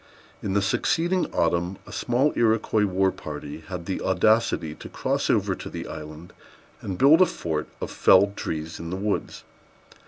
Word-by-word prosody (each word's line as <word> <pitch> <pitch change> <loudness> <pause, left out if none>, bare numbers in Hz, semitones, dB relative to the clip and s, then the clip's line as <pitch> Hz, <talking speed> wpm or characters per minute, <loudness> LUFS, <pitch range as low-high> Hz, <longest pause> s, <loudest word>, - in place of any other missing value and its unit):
In 95 - -2
the 100 0 +2
succeeding 175 - +1
autumn 85 +2 0
a - - -12
small 130 +5 +1
Iroquois 110 -2 +2
war 95 0 +2
party 75 0 -7
had 90 -3 -6
the 95 - -3
audacity 95 -4 +2
to - - -11
cross - - -1
over - - +2
to - - -7
the - - -6
island, 75 +2 -9 0.5
and 95 -2 -4
build 145 - +6
a 185 - +7
fort 80 -2 -3
of - - -5
felled 100 +2 +4
trees 80 -2 -4
in 85 - -6
the 90 - -3
woods. 100 +1 -3
95 Hz, 165 wpm, -25 LUFS, 85-110 Hz, 0.5 s, a